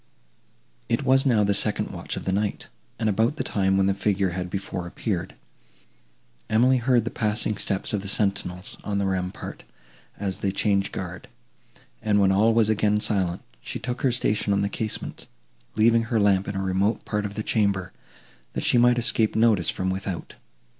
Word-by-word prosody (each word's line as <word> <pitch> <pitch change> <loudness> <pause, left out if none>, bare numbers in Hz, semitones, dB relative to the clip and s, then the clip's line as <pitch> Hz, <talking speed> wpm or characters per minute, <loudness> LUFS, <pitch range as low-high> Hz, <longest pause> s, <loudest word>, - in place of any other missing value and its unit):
It 115 +4 +1
was 135 +1 +4
now 110 -5 +4
the 100 0 +2
second 105 +1 0
watch - - -5
of - - -6
the 95 - 0
night, 105 +1 -2 0.3
and 110 - -1
about 110 +6 +2
the - - -2
time 95 -1 +1
when 95 - +3
the 100 - +2
figure 100 -1 0
had 90 0 -4
before 95 -2 -4
appeared. 90 -1 -3 1.1
Emily 125 +4 +4
heard 120 -2 +2
the - - -3
passing 105 0 -1
steps 100 0 -2
of 105 - 0
the 100 - -6
sentinels, 100 -2 -2
on 100 -1 -2
the 100 - 0
rampart, 95 -1 -4 0.5
as 95 -2 -2
they 100 - 0
changed 100 0 +1
guard; 90 -1 -6 0.7
and, 105 -1 +2
when 95 -1 +4
all 105 +4 +4
was 115 -1 +3
again 105 -1 +2
silent, 95 -4 0 0.2
she - - -5
took 125 +1 -4
her 130 - +3
station 105 -4 +1
at 100 - +1
the 100 - 0
casement, 110 +1 -4 0.5
leaving 115 +1 +4
her 115 -1 0
lamp 100 -2 +3
in 100 - -4
a 95 - -1
remote 95 +4 0
part 105 -1 -1
of 105 0 -5
the 110 - -3
chamber, 100 -5 0 0.6
that - - -3
she 120 - +4
might 120 0 +5
escape 115 -2 +2
notice 110 -6 +3
from 95 0 -1
without. 95 -2 -4
105 Hz, 185 wpm, -25 LUFS, 95-110 Hz, 1.1 s, might